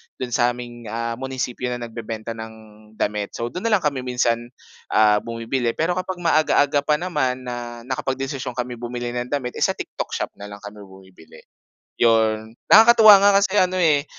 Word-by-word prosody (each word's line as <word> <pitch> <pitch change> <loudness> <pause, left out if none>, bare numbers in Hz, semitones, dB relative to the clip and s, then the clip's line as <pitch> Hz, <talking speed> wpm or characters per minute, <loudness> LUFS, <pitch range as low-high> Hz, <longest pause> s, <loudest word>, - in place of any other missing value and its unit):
do'n 125 -1 -6
sa 120 0 +2
aming 120 -2 -9
ah, 115 +2 -4
munisipyo 130 -2 -4
na 125 - -2
nagbebenta 115 -1 -6
ng 110 0 -8 0.4
damit. 105 -1 -3
So 120 +1 -4
do'n 185 +6 -3
na 220 - +4
lang 190 - -1
kami 140 -3 0
minsan, 120 -2 -1 0.4
ah, 105 -1 +4
bumibili 115 +2 -3
pero 165 +3 0
kapag 185 +1 -3
maaga-aga 150 -2 +3
pa 150 - +4
naman 130 -7 -2
na 120 -1 -7
nakapag-desisyon 130 0 -4
kami 125 -1 -4
bumili 120 0 -5
ng 120 0 -4
damit 130 -3 -3
eh, - - +1
sa - - +1
TikTok - - -6
Shop - - -3
na 100 - -8
lang 105 +1 -11
kami 105 +1 -10
bumibili, 95 -3 -17 0.5
'yon. 110 -1 +2 0.2
Nakakatuwa 220 -2 +9
nga 200 0 +5
kasi 200 +1 0
ano, 185 -1 +2
eh, 150 -3 +3
125 Hz, 180 wpm, -22 LUFS, 115-145 Hz, 0.5 s, Nakakatuwa